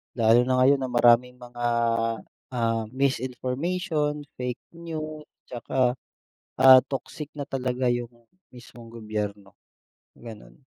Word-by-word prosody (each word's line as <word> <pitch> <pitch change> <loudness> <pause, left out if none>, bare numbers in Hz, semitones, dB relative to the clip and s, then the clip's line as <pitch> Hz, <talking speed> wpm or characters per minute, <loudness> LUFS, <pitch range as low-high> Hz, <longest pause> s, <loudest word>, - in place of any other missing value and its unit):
Lalo 115 0 +5
na 130 - +2
ngayon 140 +1 +5
na 130 - -2
maraming 120 0 +4
mga, 120 -1 -7 0.9
ah, 115 -1 0
misinformation, 145 +4 -1 0.2
fake 125 -1 -4
news, 155 -2 -7 0.2
tsaka, 125 +1 -1 0.7
ah, 130 0 +9
toxic 140 +2 -6
na 145 - -4
talaga 130 -2 -1
yung 120 -1 -3 0.4
mismong 120 -1 -14
gobyerno, 105 -3 -5 0.6
ganun. 115 -3 -12
125 Hz, 105 wpm, -25 LUFS, 120-140 Hz, 0.9 s, ah